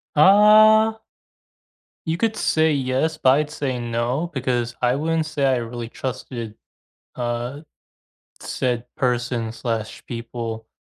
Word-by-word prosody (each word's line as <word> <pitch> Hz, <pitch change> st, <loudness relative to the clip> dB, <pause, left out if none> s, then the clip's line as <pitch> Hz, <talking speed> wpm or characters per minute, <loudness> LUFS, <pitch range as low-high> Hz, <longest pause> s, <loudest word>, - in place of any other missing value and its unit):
Uh 215 Hz, +6 st, +6 dB, 1.1 s
You 160 Hz, +1 st, -1 dB
could 225 Hz, 0 st, 0 dB
say 160 Hz, 0 st, +2 dB
"yes," 140 Hz, +3 st, 0 dB
but 130 Hz, -, +3 dB
I'd 150 Hz, +2 st, +2 dB
say 135 Hz, -5 st, -3 dB
"no" 120 Hz, +7 st, -1 dB
because 125 Hz, -3 st, -1 dB
I 125 Hz, +1 st, +2 dB
wouldn't 160 Hz, +2 st, 0 dB
say 150 Hz, -3 st, -1 dB
I 130 Hz, -1 st, +3 dB
really 115 Hz, 0 st, -5 dB
trusted, 120 Hz, -4 st, -6 dB, 0.6 s
uh, 120 Hz, +4 st, -3 dB, 0.8 s
said 125 Hz, -2 st, -2 dB
person/people, 115 Hz, -1 st, -3 dB
130 Hz, 105 wpm, -22 LUFS, 120-155 Hz, 1.1 s, Uh